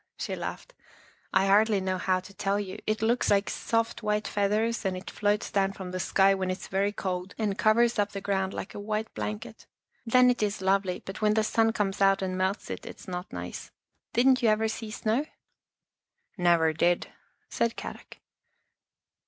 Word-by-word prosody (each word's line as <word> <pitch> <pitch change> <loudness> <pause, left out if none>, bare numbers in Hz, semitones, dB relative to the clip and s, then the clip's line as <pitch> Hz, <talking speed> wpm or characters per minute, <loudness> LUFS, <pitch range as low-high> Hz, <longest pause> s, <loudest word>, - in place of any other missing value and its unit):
she - - -3
laughed. - - -6 0.3
" - - -30
I 195 - +3
hardly 205 +1 +4
know 185 -1 -1
how 185 0 +1
to 200 +2 -13
tell 200 0 0
you. 190 -2 -5
It 215 +1 0
looks 235 +2 +2
like 200 0 +2
soft, 230 0 -1
white 210 0 0
feathers 210 +3 0
and 190 -2 -1
it 185 - -8
floats 210 0 0
down 195 -1 +1
from 190 -2 -7
the 185 - -3
sky 195 +1 +4
when 190 -1 -2
it's 185 - -4
very 195 +1 +1
cold 185 -1 -4
and 210 -3 0
covers 230 +1 +3
up 205 0 +1
the 200 - -4
ground 195 -1 -1
like - - -6
a - - -7
white 215 +1 -3
blanket. 220 +2 -6 0.4
Then 250 +2 +5
it 245 - -3
is 210 -1 0
lovely, 190 -1 0
but 195 - -7
when 215 0 +3
the 220 - +3
sun 225 +1 +2
comes 205 -3 -2
out 195 0 +4
and 185 -1 -2
melts 190 +2 -1
it, - - -5
it's - - -10
not 180 0 -5
nice. - - -6 0.4
Didn't 255 +2 +4
you 230 - +4
ever 215 +1 +2
see 220 0 -5
snow? 225 +7 -1 0.4
" - - -63
" - - -62 0.2
Never 170 -3 +3
did," 175 +2 +1 0.4
said 235 -1 0
Kadok. - - -8
205 Hz, 195 wpm, -28 LUFS, 190-220 Hz, 0.4 s, Then